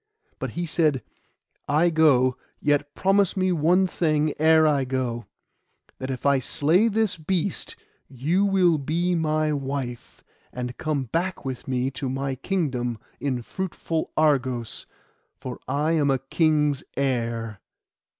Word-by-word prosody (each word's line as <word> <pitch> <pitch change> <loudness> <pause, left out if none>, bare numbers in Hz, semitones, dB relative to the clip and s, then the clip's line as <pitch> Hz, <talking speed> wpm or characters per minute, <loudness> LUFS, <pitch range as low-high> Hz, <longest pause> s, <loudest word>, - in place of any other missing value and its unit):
But - - -3
he 175 - -1
said, 155 -6 +1 0.7
'I 160 +4 +3
go; 135 -6 +4 0.2
yet 145 -1 0
promise 195 0 +2
me 185 0 +2
one 175 +3 +3
thing 155 -4 +1
ere 160 0 +5
I 145 -3 +3
go: 125 -3 -3 0.7
that 130 - -4
if 130 0 -5
I 140 -1 +4
slay 160 - +2
this 220 -3 +1
beast 175 +2 -2 0.3
you 155 +10 0
will 185 -5 +3
be 170 +6 0
my 155 -2 +1
wife, 135 -4 -5 0.3
and 125 0 -5
come 150 -4 -1
back 170 +7 -2
with 130 -2 -5
me 130 0 0
to 135 0 -4
my 135 +1 -2
kingdom 130 - -2 0.2
in 130 -4 -2
fruitful 165 0 -3
Argos, 130 -6 +1 0.5
for - - -7
I 150 +3 0
am 150 -3 +2
a 135 - +3
king's 150 +1 +1 0.2
heir. 115 -5 -1
145 Hz, 135 wpm, -25 LUFS, 130-165 Hz, 0.7 s, ere